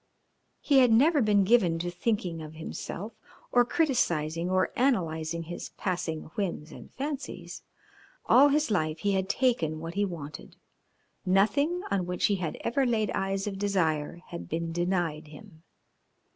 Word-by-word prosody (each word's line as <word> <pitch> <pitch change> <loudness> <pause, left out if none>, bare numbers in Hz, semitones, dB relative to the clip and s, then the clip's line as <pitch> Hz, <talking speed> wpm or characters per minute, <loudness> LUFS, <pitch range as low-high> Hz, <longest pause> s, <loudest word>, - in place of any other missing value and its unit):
He 280 -3 +4
had 250 -3 +5
never 290 +6 +5
been 205 -3 +4
given 190 -5 +3
to 175 +1 -3
thinking 180 -3 -2
of 155 0 -9
himself, 180 +6 -6 0.4
or 245 - +5
criticising 175 - 0
or 185 0 +1
analysing 170 - 0
his 175 +2 -7
passing 170 -4 -2
whims 170 -6 -3
and - - -12
fancies. 285 +1 -5 0.6
All 275 +3 +7
his 295 -3 +1
life 155 -5 0
he 200 - +1
had 190 -1 0
taken 170 - +1
what 165 +1 -6
he 200 +2 0
wanted; 150 -6 -6 0.7
nothing 285 - +2
on 185 -3 0
which 180 0 0
he 200 - +2
had 170 -4 -4
ever 240 +4 +1
laid 225 -5 +1
eyes 195 0 -1
of 195 -2 -4
desire 175 -5 0
had 170 - -7
been 165 +1 -2
denied 175 -3 -1
him. 160 +2 -14
185 Hz, 150 wpm, -28 LUFS, 165-230 Hz, 0.7 s, All